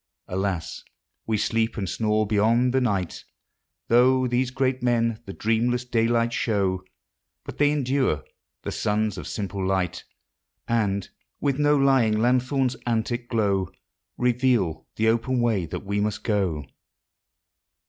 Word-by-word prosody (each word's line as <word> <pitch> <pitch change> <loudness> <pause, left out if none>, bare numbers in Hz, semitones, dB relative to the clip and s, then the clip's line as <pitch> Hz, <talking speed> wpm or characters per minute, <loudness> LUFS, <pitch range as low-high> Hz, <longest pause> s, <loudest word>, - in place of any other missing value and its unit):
Alas! 90 -3 -3 0.4
we 110 -1 +1
sleep 115 +2 0
and 100 -3 -2
snore 110 +3 +1
beyond 115 +4 +2
the 130 - +3
night, 100 -8 -1 0.6
Tho' 130 +2 +4
these 125 +1 +1
great 130 0 -1
men 115 -2 +1
the - - -5
dreamless 120 +4 0
daylight 115 0 +1
show; 100 -6 0 0.6
But - - -9
they 145 0 +5
endure—the 135 - -2
Sons 105 -2 -1
of - - -7
simple 100 -2 -4
Light— 95 -2 -1 0.6
And, 100 -4 0 0.3
with 140 -1 0
no 145 0 +4
lying 135 -6 +3
lanthorne's 125 +2 +1
antic 120 +1 -1
glow, 100 -5 +1 0.5
Reveal 125 - +1
the 110 - +1
open 120 +3 +1
way 110 -8 +1
that 100 - -6
we 100 +1 -1
must 105 +1 -2
go. 95 - 0
115 Hz, 130 wpm, -25 LUFS, 100-125 Hz, 0.6 s, they